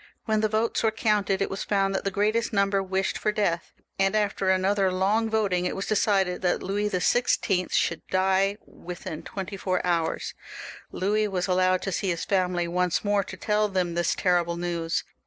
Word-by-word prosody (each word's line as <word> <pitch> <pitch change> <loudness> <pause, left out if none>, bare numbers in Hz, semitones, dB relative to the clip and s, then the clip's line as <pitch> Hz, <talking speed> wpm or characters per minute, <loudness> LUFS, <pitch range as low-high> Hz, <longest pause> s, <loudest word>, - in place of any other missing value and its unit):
When 215 -2 +1
the 215 - +1
votes 220 +2 0
were 225 - +3
counted 210 -3 +1
it - - -3
was 195 - -3
found 195 -1 +1
that 190 - -1
the 195 - 0
greatest 215 +4 0
number 200 -1 +2
wished 190 0 -1
for 210 - +1
death, 200 -5 -1 0.3
and, 195 +1 +2
after 205 -2 0
another 190 +1 +2
long 205 +5 +1
voting, 200 -5 +1
it - - -3
was 195 - -3
decided 195 -4 +1
that 180 -1 0
Louis 205 +2 -1
XVI. 190 -1 +1
should 170 - 0
die 190 +2 +2
within 175 -3 -8
twenty 195 0 -6
four 185 -1 0
hours. 170 -2 -1 0.6
Louis 210 +3 0
was 185 -3 -1
allowed 185 0 +2
to 195 - -2
see 190 +2 -1
his 170 -2 -2
family 180 -3 0
once 180 +2 0
more, 205 -1 +2
to 190 - -9
tell 210 +3 +1
them 180 -3 -1
this 170 0 0
terrible 175 -2 +1
news. 170 -1 -2
195 Hz, 185 wpm, -26 LUFS, 180-205 Hz, 0.6 s, were